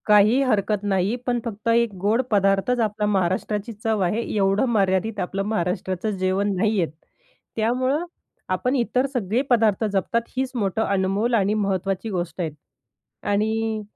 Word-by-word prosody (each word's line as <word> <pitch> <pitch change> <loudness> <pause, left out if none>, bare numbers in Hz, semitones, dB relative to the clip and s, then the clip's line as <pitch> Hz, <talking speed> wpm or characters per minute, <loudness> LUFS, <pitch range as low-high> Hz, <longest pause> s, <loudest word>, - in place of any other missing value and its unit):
काही 210 +5 +5
हरकत 210 -4 +1
नाही. 195 +2 +1
पण 245 -1 +1
फक्त 220 -1 -6
एक 230 -1 +3
गोड 215 +5 +2
पदार्थच 195 +4 +2
आपल्या 210 -2 0
महाराष्ट्राची 200 +3 -1
चव 220 0 -1
आहे, 205 +6 0
एवढं 195 +3 +2
मर्यादित 205 0 +1
आपलं 195 +2 -2
महाराष्ट्राचं 185 -1 -1
जेवण 190 +2 0
नाहीयेत. 195 -3 +1 0.7
त्यामुळं 255 +8 0 0.4
आपण 250 +9 0
इतर 250 +1 +1
सगळे 230 0 0
पदार्थ 225 -3 +3
जपतात 200 +4 0
हीच 260 0 -1
मोठं 210 -2 0
अनमोल 200 +4 0
आणि 205 -2 +3
महत्त्वाची 195 0 -1
गोष्ट 175 -3 -3
आहे. 165 - -1 0.7
आणि 220 +1 0
210 Hz, 140 wpm, -23 LUFS, 195-225 Hz, 0.7 s, काही